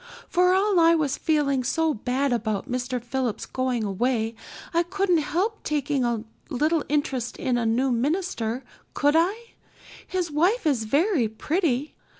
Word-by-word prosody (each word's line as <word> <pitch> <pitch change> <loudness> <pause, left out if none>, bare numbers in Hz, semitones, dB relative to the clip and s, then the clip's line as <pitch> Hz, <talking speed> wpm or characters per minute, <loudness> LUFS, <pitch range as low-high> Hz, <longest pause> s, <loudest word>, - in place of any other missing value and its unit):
For 360 +1 +3
all 390 -1 +3
I 335 0 +6
was 295 -4 0
feeling 285 -5 +1
so 320 +5 +1
bad 255 +3 -1
about 220 -3 -2
Mr. 250 0 -2
Phillips 240 -2 -3
going 255 -3 -1
away 225 +3 0 0.4
I 335 - +4
couldn't 360 0 +1
help 380 +9 -1
taking 290 -2 -1
a 235 -2 -1 0.3
little 305 +3 +1
interest 270 -5 -1
in 255 - 0
a 235 -2 0
new 250 +4 +2
minister, 255 - -1 0.3
could 290 0 +3
I? 405 +8 +1 0.6
His 360 -4 -2
wife 355 +10 +2
is 265 -8 +1
very 290 - +2
pretty. 295 - -1
280 Hz, 150 wpm, -25 LUFS, 245-335 Hz, 0.6 s, I